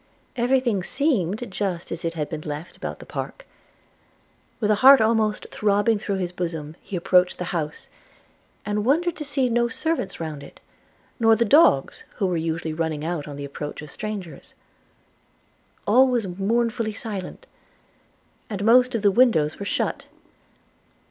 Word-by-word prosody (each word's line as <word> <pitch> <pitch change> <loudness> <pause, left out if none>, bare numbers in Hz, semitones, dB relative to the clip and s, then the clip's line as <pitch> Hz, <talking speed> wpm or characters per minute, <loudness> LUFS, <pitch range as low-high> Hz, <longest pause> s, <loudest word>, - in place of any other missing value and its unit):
Every 250 +2 +3
thing 235 -7 0
seemed 220 - -1
just 185 -3 -3
as 170 - -5
it 165 0 -2
had 150 -2 -2
been 155 -1 -5
left 150 +2 -6
about - - -6
the - - -12
park. - - -6 1.1
With 215 -2 +1
a 210 - +1
heart 270 +1 +9
almost 220 -1 +1
throbbing 205 +1 +2
through 200 -1 -2
his 180 -2 -2
bosom, 165 -4 -5
he 195 - -7
approached 180 +1 +3
the - - -3
house, 155 -3 -4 0.8
and 210 0 -1
wondered 330 +8 +2
to 300 - -4
see 280 -3 0
no 235 0 +2
servants 260 -1 -3
round 155 -3 -5
it; 140 - -13 0.6
nor 225 -1 +5
the 235 - +1
dogs, 205 - +4
who 195 - -1
were 180 -2 0
usually 160 0 -2
running 155 -2 -2
out 165 -3 -3
on 145 - -7
the 140 0 -6
approach 145 +1 -7
of 150 - -10
strangers. 195 -9 -7 1.3
All 255 +6 +5
was 245 -4 0
mournfully 220 +4 -1
silent; 210 - -6 1.0
and 205 -2 -3
most 250 +2 +5
of 220 - -2
the 200 - +5
windows 190 -10 +3
were 200 - -4
shut. - - -2
205 Hz, 160 wpm, -24 LUFS, 165-235 Hz, 1.3 s, heart